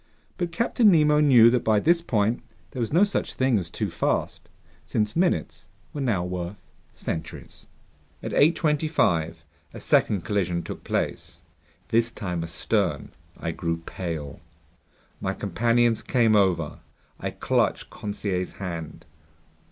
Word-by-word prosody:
But 175 -2 -1
Captain 230 +3 +3
Nemo 150 -4 +4
knew 125 -6 +7
that 125 -1 +1
by 110 -2 +3
this 170 +7 +3
point 115 -6 0 0.3
there 130 - -7
was 115 - -1
no 175 +6 +5
such 205 -1 -1
thing 130 -4 +2
as 85 -3 -6
too - - -3
fast, - - -2 0.3
since 105 -1 -1
minutes 165 - 0 0.3
were 145 - -4
now 110 -9 +1
worth 90 +2 -5 0.4
centuries. 80 - -7 0.6
At - - -4
8:25 150 - +2 0.4
a - - -7
second 100 -4 +2
collision 90 -4 -1
took - - -8
place. 85 +5 -3 0.5
This 115 +1 +2
time 90 -7 -4
astern. 85 0 -1 0.3
I 85 - -2
grew 85 0 -3
pale. 80 -5 -5 0.8
My - - -2
companions 115 +4 +1
came 115 -1 +2
over. 90 -6 +1 0.4
I - - -3
clutched - - 0
Conseil's 100 -3 -3
hand. 85 -5 -6
105 Hz, 130 wpm, -25 LUFS, 85-135 Hz, 0.8 s, knew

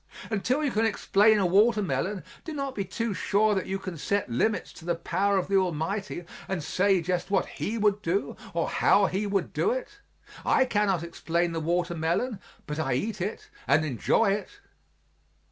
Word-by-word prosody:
Until 250 +8 0
you 285 - +1
can 220 0 +1
explain 215 -1 +4
a 200 - +2
watermelon, 195 - +2 0.2
do 320 - -6
not 275 -2 -3
be 200 - -2
too 220 +3 -3
sure 210 +3 +2
that 190 - -1
you 195 - -1
can 185 -4 -7
set 200 -5 -1
limits 210 - 0
to - - -13
the 170 0 0
power 190 +4 0
of 185 - 0
the 195 0 +3
Almighty 180 +1 -2 0.2
and 185 -5 -2
say 190 +3 +2
just 180 +2 -1
what 195 -1 +2
He 225 +3 -4
would 210 -1 +2
do 195 +1 -1 0.2
or 170 - +1
how 200 - +4
He 195 +2 -1
would 195 -3 -1
do 420 - +1
it. 475 -4 -4 0.4
I 260 - +4
cannot 205 -7 +1
explain 170 0 -1
the 165 - -2
watermelon, 175 +6 -1 0.3
but 150 +1 -4
I 135 -4 0
eat 210 - -2
it 200 +4 -4 0.2
and 145 +4 +4
enjoy 155 - +2
it. 200 0 -2
195 Hz, 180 wpm, -27 LUFS, 170-210 Hz, 0.4 s, explain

